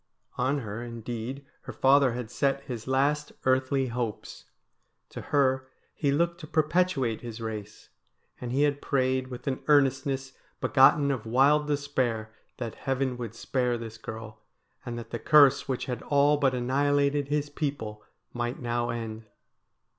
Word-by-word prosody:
On 140 +2 +1
her, 110 0 -5
indeed, 120 +3 -6 0.2
her - - -6
father 135 -2 +4
had 120 -2 -5
set 140 0 0
his 120 -4 -6
last 145 +3 +1
eartbly 130 0 +2
hopes. 115 -2 -5 0.6
To - - -7
her 130 -2 +1 0.3
he 140 -2 0
looked 170 +4 +1
to 155 - -9
perpetuate 155 -7 +1
his 120 -1 -7
race, 110 -2 -7 0.5
and 120 -1 -5
he 140 +3 +2
had 145 -1 +1
prayed 130 -1 0
with 125 -1 -9
an 130 -2 -2
earnestness 135 -2 +2 0.3
begotten 140 +1 +5
of 120 -5 -4
wild 140 +5 +4
despair 130 -7 -1 0.2
that 115 -3 -4
heaven 135 -1 -1
would 115 -2 -6
spare 125 0 -1
this 115 -1 -8
girl, 110 -1 -8 0.4
and 120 -3 -5
that 120 - -8
the 120 - -3
curse 145 -4 +5
which 130 -2 -2
had 125 -3 -4
all 145 +1 +3
but 135 -3 +2
annihilated 140 +3 +1
his 145 0 -1
people 140 -9 -4 0.3
might 120 0 -3
now 120 -1 -1
end. 115 -1 -5
130 Hz, 150 wpm, -28 LUFS, 120-140 Hz, 0.6 s, begotten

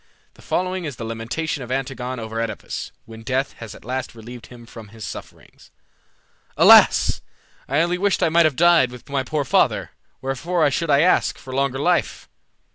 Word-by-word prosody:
The - - -19
following 185 0 -2
is 145 -4 -5
the 115 - -7
lamentation 115 +7 -4
of 125 0 -7
Antigone 130 -1 -3
over 110 0 -6
OEdipus, 115 - -5 0.2
when 115 0 -11
death 130 +4 -2
has 115 -3 -9
at - - -16
last 130 0 -4
relieved 115 0 -11
him 120 -1 -13
from 115 -2 -12
his 110 0 -10
sufferings: - - -11 0.9
"Alas! - - +6 0.5
I 140 +4 +2
only 175 +1 0
wished 200 -1 +1
I - - +3
might 170 +1 +4
have 150 - -3
died 170 -5 +4
With 125 -1 -13
my 140 -1 0
poor 145 +2 -2
father; - - +1 0.3
wherefore 150 +4 0
should 165 +4 -2
I 140 0 +5
ask 165 -2 +2
For 130 - -10
longer 135 0 0
life? 175 +5 0
135 Hz, 180 wpm, -21 LUFS, 120-160 Hz, 0.9 s, Alas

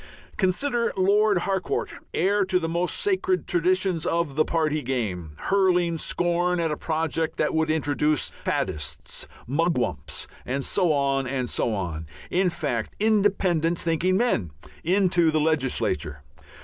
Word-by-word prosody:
Consider 235 +5 +1
Lord 205 +2 +4
Harcourt 190 -2 -1 0.2
heir 200 +4 +2
to 185 -1 +2
the 165 -2 -1
most 170 +2 -1
sacred 375 -2 0
traditions 180 -1 +1
of 170 -5 0
the 155 - +4
party 155 -2 0
game 100 - -3
hurling 180 -4 +2
scorn 175 +1 +1
at 165 -2 0
a - - 0
project 160 0 -2
that - - +1
would 160 0 +1
introduce 150 -1 +1
"faddists, 75 +1 -3 0.2
mugwumps," 130 - -1 0.2
and 135 +2 -2
so 180 -4 +2
on 135 -2 +1
and 130 -1 -2
so 115 - 0
on 85 -5 -4 0.2
in 185 +1 +3
fact 145 -9 -3
independent 195 -6 +2
thinking 170 +3 +1
men 200 - +1 0.3
into 175 -2 +3
the 155 0 +2
legislature. 135 - 0
165 Hz, 135 wpm, -25 LUFS, 140-185 Hz, 0.3 s, Lord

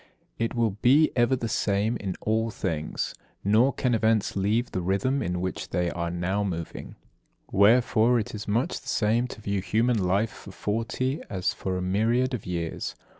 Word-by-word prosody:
It 115 +1 -1
will 115 -2 +2
be 145 +5 +5
ever 120 +2 +3
the 120 -2 -3
same 105 +1 0
in 95 -3 -4
all 110 +1 +1
things; 80 -8 -3 0.3
nor 110 +7 +4
can 125 -2 0
events 110 -2 +2
leave 105 +5 +1
the 90 - -2
rhythm 100 +10 0
in 90 -4 -2
which 95 0 -4
they 90 -1 0
are 85 0 -3
now 90 +4 -1
moving. 85 -4 -5 0.6
Wherefore 115 +3 +4
it 110 - -4
is 105 -1 -6
much 120 - 0
the - - -17
same 115 +3 +1
to 110 - -10
view 100 -1 -1
human 110 +5 +1
life 100 +5 +1
for 95 - -12
forty, 115 +8 -2
as 95 -4 -1
for 95 -1 -3
a 90 - -3
myriad 115 +7 +1
of 115 -7 -4
years. 85 -2 -3
105 Hz, 175 wpm, -26 LUFS, 95-120 Hz, 0.6 s, be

